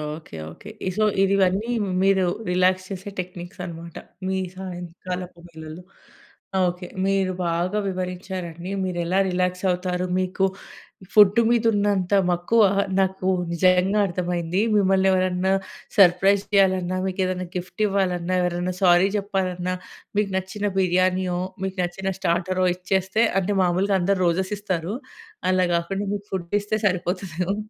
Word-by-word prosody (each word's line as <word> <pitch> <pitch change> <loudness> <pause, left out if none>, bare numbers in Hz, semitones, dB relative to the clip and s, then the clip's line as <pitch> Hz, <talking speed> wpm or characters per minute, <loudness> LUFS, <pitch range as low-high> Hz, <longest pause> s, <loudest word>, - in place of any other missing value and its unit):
Okay 155 - -12 0.2
okay. 205 - -12 0.2
ఈ - - +2
so 215 - +3 0.2
ఇదివన్నీ 195 +3 +2 0.3
మీరు 195 -1 +3 0.2
relax 185 +1 +2
చేసే 195 0 -6
టెక్నిక్స్ 180 +1 -7
అనమాట, 170 -1 -9 0.3
మీ 190 0 0 0.2
సాయంకాలపు 180 -1 -6
వేళలో. 160 +1 -10 0.8
ఓకే. 180 0 -4 0.2
మీరు 195 -1 +1
బాగా 175 +5 0
వివరించారండి. 180 -1 -5
మీరు 180 -2 -3
ఎలా 185 +3 +1
రిలాక్స్ 180 0 -1
అవుతారు. 180 0 -1
మీకు 185 +1 0 0.7
ఫుడ్ 210 +1 +7
మీద 235 -1 +2
ఉన్నంత 200 -2 +1 0.2
మక్కువ 175 +6 +3 0.4
నాకు 190 -1 0 0.2
నిజంగా 185 +4 +3
అర్థమైంది. 175 +1 -1
మిమ్మల్ని 195 -1 +3
ఎవరన్నా 185 0 +1 0.5
సర్ప్రైజ్ 195 +2 +5
చేయాలన్నా, 185 -2 +3
మీకు 190 0 -2
ఏదైనా 185 -1 -3
గిఫ్ట్ 180 +3 -6
ఇవ్వాలన్నా, 185 -2 0
ఎవరన్నా 180 +1 -1
సారీ 180 +1 +5
జెప్పాలన్నా, 185 -3 -2 0.4
మీకు 210 -1 +2
నచ్చిన 200 +2 -3
బిర్యానీయో, 185 0 +2 0.2
మీకు 190 0 -3
నచ్చిన 190 +2 -3
స్టార్టరో 185 +1 0
ఇచ్చేస్తే 190 +4 0 0.2
అంటే 195 +2 -1
మామూలుగా 185 +3 +1
అందరూ 190 +1 +1
రోజెస్ 185 +4 0
ఇస్తారు. 190 0 -3 0.5
అలా 185 0 +3
గాకుండా 195 +4 -2
మీకు 205 0 -8
ఫుడ్ 175 -2 -3
ఇస్తే 215 +1 -2
సరిపోతుంది 180 -1 -2
ఏమో. 195 +2 -1
185 Hz, 130 wpm, -23 LUFS, 180-195 Hz, 0.8 s, ఫుడ్